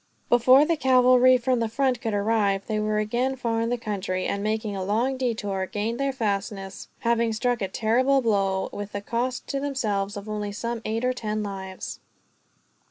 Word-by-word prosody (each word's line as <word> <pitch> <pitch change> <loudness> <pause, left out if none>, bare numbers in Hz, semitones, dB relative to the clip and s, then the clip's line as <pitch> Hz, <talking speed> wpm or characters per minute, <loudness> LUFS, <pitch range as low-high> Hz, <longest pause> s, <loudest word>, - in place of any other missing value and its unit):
Before 255 +4 +6
the 335 +1 +1
cavalry 255 -1 +5
from 250 0 0
the 230 -1 -1
front 255 0 0
could 220 -2 -1
arrive, 200 -2 +1
they 215 -1 -1
were 215 0 0
again 240 +5 0
far 230 -3 -1
in 230 - 0
the 245 - 0
country; 195 -4 -3
and, 200 - -1
making 215 0 -2
a 190 - -3
long 230 +7 0
detour, 210 -7 -2
gained 220 +5 -3
their 275 0 +1
fastness, 200 -4 -3
having 230 -1 +1
struck 240 +1 0
a 195 - 0
terrible 245 +7 +2
blow, 195 -5 +1
with 205 0 -6
the 205 - -3
cost 240 +4 -2
to 275 - -1
themselves 210 -8 -2
of 205 +1 -8
only 210 -1 -3
some 235 +2 -4
eight 225 +3 -1
or 255 - +2
ten 215 -3 -3
lives. 190 -2 -6
225 Hz, 185 wpm, -25 LUFS, 205-250 Hz, -, Before